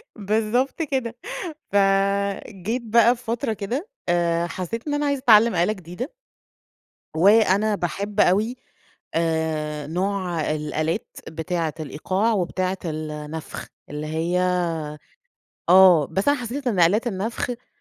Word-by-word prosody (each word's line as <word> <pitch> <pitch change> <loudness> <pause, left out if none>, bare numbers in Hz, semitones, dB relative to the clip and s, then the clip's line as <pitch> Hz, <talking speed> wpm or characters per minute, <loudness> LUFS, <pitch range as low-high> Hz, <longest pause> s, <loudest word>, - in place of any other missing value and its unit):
بالضبط 225 - 0
كده، 260 -6 -2 0.6
فجيت 200 +2 +1
بقى 235 +1 +5
بفترة 235 0 -3
كده 235 - -4 0.2
آآ، 170 -1 +1
حسيت 185 - -5
إن 290 - 0
أنا 290 0 0
عايزة 280 -1 +1
اتعلم 230 -2 +6
آلة 175 +5 +2
جديدة. 185 - -7 1.0
وأنا 205 +3 +4
باحب 200 +3 -3
أوي 210 +7 +3 0.6
آآ، 160 -2 -1
نوع 180 -1 -1
الآلات 155 +1 -2 0.2
بتاعة 165 -1 -2
الإيقاع 185 +9 -1
وبتاعة 185 -1 -1
النفخ، 155 0 -5 0.2
اللي 150 +1 -5
هي 165 +3 0 1.3
آه، 180 -5 +7
بس 195 +5 -2
أنا 285 0 +4
حسيت 250 +3 -4
إن 205 -7 +1
آلات 205 +9 +4
النفخ 230 +4 -3
195 Hz, 110 wpm, -23 LUFS, 170-230 Hz, 1.3 s, آه